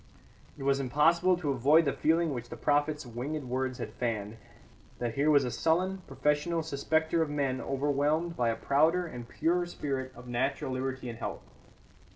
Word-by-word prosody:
It - - -7
was 135 0 +2
impossible 165 +7 +3
to 155 -5 -1
avoid 145 +6 +4
the 140 - +1
feeling 165 0 +2
which 120 -2 -6
the - - -7
prophet's 145 0 +1
winged 130 +6 -4
words 130 0 -2
had - - -6
fanned, 110 -3 -3 0.6
that 120 -2 -2
here 140 +5 +2
was 145 -2 +5
a 125 - -2
sullen, 185 +7 +1
professional 150 +5 0
suspecter 160 +2 0
of 160 - 0
men 140 -3 -1
overwhelmed 145 +4 0
by 120 -1 +1
a 115 - 0
prouder 160 +9 +2
and 125 -7 -8
purer 175 +1 0
spirit 135 -6 -3
of 120 +1 -12
natural 130 +2 -1
liberty 130 0 -3
and 115 -1 -6
health. - - -5
140 Hz, 175 wpm, -30 LUFS, 130-160 Hz, 0.6 s, was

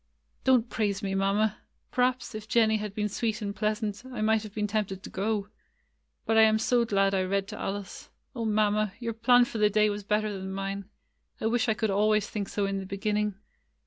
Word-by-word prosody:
"Don't 255 -3 +4
praise 205 -4 -1
me. 195 -1 -1
Mamma. 200 +2 +1 0.3
Perhaps, 250 0 0
if 215 0 -7
Jen 225 0 +4
nie 220 - +2
had 210 -1 -5
been 210 -1 0
sweet 220 +1 -2
and 200 -2 -4
pleasant, 210 0 -1
I 255 -3 -8
might 220 0 +3
have 210 -1 -10
been 210 -1 0
tempted 200 -2 -2
to - - -8
go. 205 +1 -1 0.8
But 225 - +2
I - - +9
am 220 0 +5
so 235 +2 +2
glad 195 -2 +2
I 190 - +2
read 195 +1 0
to 215 - -7
Alice! 200 -1 -5 0.3
O 235 - -3
Mamma! 215 -1 +1
your 230 -2 -3
plan 245 +2 +5
for 230 - -5
the 210 0 +5
day 210 0 +3
was 205 0 -5
better 210 +1 0
than 190 0 -5
mine. 195 0 -4 0.5
I - - -4
wish 235 +1 +1
I 220 - +2
could 220 -2 0
always 210 +1 +2
think 200 -2 -4
so 205 - -1
in 195 0 -1
the 190 - -6
beginning." 210 +1 -1
210 Hz, 215 wpm, -28 LUFS, 200-220 Hz, 0.8 s, I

